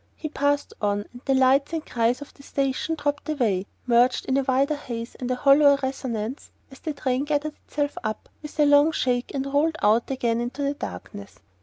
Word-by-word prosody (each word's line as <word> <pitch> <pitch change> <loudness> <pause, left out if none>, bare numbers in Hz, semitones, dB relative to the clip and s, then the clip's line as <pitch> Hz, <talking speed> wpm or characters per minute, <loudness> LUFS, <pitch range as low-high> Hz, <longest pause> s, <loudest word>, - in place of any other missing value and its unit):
He 310 - -5
passed 285 -1 0
on, 205 0 0
and 245 - -11
the 270 - +2
lights 265 +3 +3
and 320 -1 -2
cries 235 +2 0
of 290 - -17
the - - -17
station 275 +3 -1
dropped 290 0 -2
away, 215 -10 0 0.2
merged 245 +1 +3
in 265 - 0
a 275 - +3
wider 270 +3 +1
haze 235 -5 -6
and 250 - -5
a 255 - +1
hollower 280 +2 +6
resonance, 255 -2 -3 0.2
as 265 - -13
the 310 - -4
train 260 -1 -1
gathered 295 +1 -1
itself 290 -1 -2
up 215 -1 -4
with 300 0 -10
a 300 - +6
long 290 +2 +6
shake 250 -4 0
and 270 0 -1
rolled 295 +4 +1
out 220 +3 +3
again 235 -3 0
into 245 +4 -3
the 280 0 0
darkness. 100 - -8
270 Hz, 200 wpm, -25 LUFS, 245-290 Hz, 0.2 s, hollower